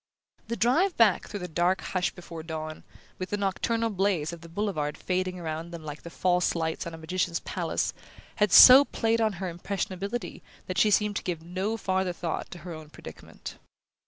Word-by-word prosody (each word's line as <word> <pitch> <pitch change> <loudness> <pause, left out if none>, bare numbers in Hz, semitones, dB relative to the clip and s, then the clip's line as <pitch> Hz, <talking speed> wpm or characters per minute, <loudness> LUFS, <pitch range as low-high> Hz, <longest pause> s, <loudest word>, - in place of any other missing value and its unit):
The 235 - -2
drive 320 - +2
back 215 -6 +4
through 205 - -6
the 180 - -4
dark 175 +3 +1
hush 185 -1 -1
before 170 -2 -9
dawn, 155 -1 -6 0.4
with 185 - -4
the 205 - -1
nocturnal 225 +3 0
blaze 190 -5 0
of 170 - -9
the 170 - -12
Boulevard 165 -6 -2
fading 185 0 -2
around 160 0 -4
them 170 -2 -8
like 150 0 -7
the 170 - -9
false 180 +1 +1
lights 160 0 -2
of 170 - -7
a - - -10
magician's 170 +1 -2
palace, - - -2 0.4
had 210 -3 +2
so 260 +2 +11
played 230 -4 0
on 220 -2 +2
her 190 +1 -4
impressionability 195 +5 -4 0.2
that 185 0 -2
she 215 - +5
seemed 210 0 +2
to - - -4
give 170 -3 -3
no 190 +6 -2
farther 190 -3 -1
thought 170 -1 -4
to 180 - -9
her 175 - -5
own 155 -1 -10
predicament. - - -11
185 Hz, 190 wpm, -27 LUFS, 170-205 Hz, 0.4 s, so